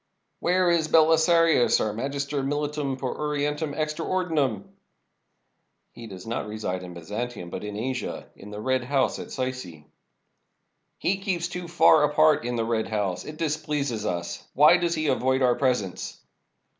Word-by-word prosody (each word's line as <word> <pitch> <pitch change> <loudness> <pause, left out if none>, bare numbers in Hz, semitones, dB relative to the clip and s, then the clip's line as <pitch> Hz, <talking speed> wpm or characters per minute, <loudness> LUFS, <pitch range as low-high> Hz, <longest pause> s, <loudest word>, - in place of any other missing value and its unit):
"Where 180 0 +2
is 165 -2 +2
Belisarius, 160 -2 +4
our 105 - -1
Magister 140 +4 -2
Militum 145 0 -2
per 130 -1 -3
Orien 150 -1 -1
tum 150 -1 -4
extra 155 +1 -2
Ordinem?" 155 - 0 1.3
"He 115 -1 -10
does 95 -3 -10
not 115 -1 -3
reside 105 -4 -4
in 90 -1 -9
Byzantium, 105 +2 -5
but - - -5
in 105 0 -5
Asia, 125 +3 -4
in 100 - -12
the 105 0 -7
Red 130 +3 0
House 135 0 +1
at - - -7
Sycse." 130 -1 -2
551 80 -4 -12
ROME - - -33 1.1
"He 195 - 0
keeps 180 -3 -1
too 180 0 -6
far 165 -2 +5
apart 150 0 +4
in 120 0 -2
the 115 -1 0
Red 115 -1 -1
House. 100 -4 -2
It 155 - -8
dis 155 -2 0
pleases 140 -7 -2
us. 85 -1 -4
Why 150 +5 +7
does 170 -1 0
he 155 -1 -2
avoid 130 -1 +1
our 125 -1 +4
presence?" 125 -9 -1
140 Hz, 170 wpm, -26 LUFS, 115-155 Hz, 1.3 s, Why